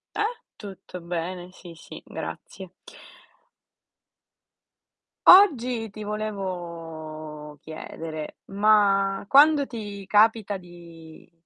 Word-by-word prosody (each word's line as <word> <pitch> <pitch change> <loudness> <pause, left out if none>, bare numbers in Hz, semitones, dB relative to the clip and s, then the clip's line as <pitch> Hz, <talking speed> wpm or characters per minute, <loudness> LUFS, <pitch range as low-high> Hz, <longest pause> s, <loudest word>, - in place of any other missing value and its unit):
Eh? 430 +3 -2 0.2
Tutto 195 -3 -10
bene, 175 +1 -5
sì, 175 -2 -13
sì, 165 - -12
grazie. 190 -3 -8 2.6
Oggi 250 - +6
ti 215 +1 -8
volevo 165 -7 -6
chiedere: 155 0 -8
ma 195 -1 +2
quando 285 +1 +5
ti 205 -4 -7
capita 210 -1 +3
di 170 -2 -15
195 Hz, 80 wpm, -25 LUFS, 170-215 Hz, 2.6 s, Oggi